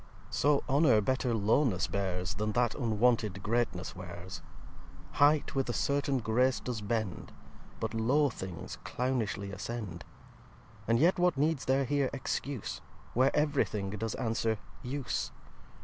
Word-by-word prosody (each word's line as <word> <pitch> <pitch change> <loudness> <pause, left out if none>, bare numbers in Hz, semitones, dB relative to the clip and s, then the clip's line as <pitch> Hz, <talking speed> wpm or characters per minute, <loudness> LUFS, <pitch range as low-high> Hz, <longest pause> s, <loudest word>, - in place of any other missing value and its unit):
viii - - -23
So 145 0 +3
Honour 135 -5 +5
better 130 +3 0
Lowness 110 -1 +2
bears, 95 -1 -2
Then 105 +3 -2
That 120 -1 +2
unwonted 110 -4 +1
Greatness 105 -6 -1
wears 90 0 -8 0.7
Height 145 +1 +3
with 135 -2 0
a - - 0
certain 140 +2 +1
Grace 125 +2 +2
does 120 -4 -4
bend, 105 -4 -2 0.5
But - - -2
low 130 +7 +3
Things 95 -7 -7
clownishly 115 -6 -1
ascend. 100 -4 -5 0.8
And 115 +1 +4
yet 170 +8 +4
what 175 -4 +3
needs 150 0 +1
there 135 +1 +2
here 140 0 +1
Excuse, 140 -2 -3 0.3
Where 130 +3 +4
ev'ry 150 -1 +3
Thing 100 -2 -4
does 110 +2 -3
answer 115 -2 0 0.2
Use? 135 +1 -2
120 Hz, 135 wpm, -31 LUFS, 105-135 Hz, 0.8 s, Honour